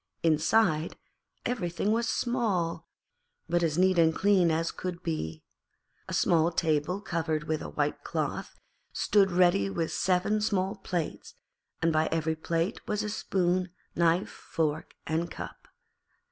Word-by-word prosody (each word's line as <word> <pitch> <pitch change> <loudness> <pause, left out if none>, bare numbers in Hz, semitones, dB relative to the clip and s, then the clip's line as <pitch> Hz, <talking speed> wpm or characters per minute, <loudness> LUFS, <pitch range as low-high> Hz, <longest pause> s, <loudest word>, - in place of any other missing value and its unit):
Inside, 160 +1 +2 0.5
everything 200 -4 -1
was 230 +1 +1
small, 185 -10 0 0.6
but 175 +1 +1
as 160 -2 +1
neat 185 -1 +4
and 160 -1 +4
clean 190 -3 +4
as 165 +1 0
could 180 -1 -5
be. 80 - -3 0.6
A - - -5
small 170 0 +3
table 160 +3 0
covered 160 -5 -1
with 155 0 -2
a - - -5
white 75 - -1
cloth - - -3 0.4
stood 200 -2 +3
ready 175 - +4
with 160 +11 -2
seven 190 +3 +1
small 195 -1 0
plates, 180 -4 -4 0.5
and 165 0 +3
by 155 0 +3
every 160 -1 0
plate 165 +3 -1
was 210 0 -1
a 210 - -2
spoon, 185 -3 0 0.3
knife, 170 +2 +2
fork, 155 -3 -3
and 165 +2 -1
cup. - - -8
170 Hz, 135 wpm, -29 LUFS, 160-190 Hz, 0.6 s, neat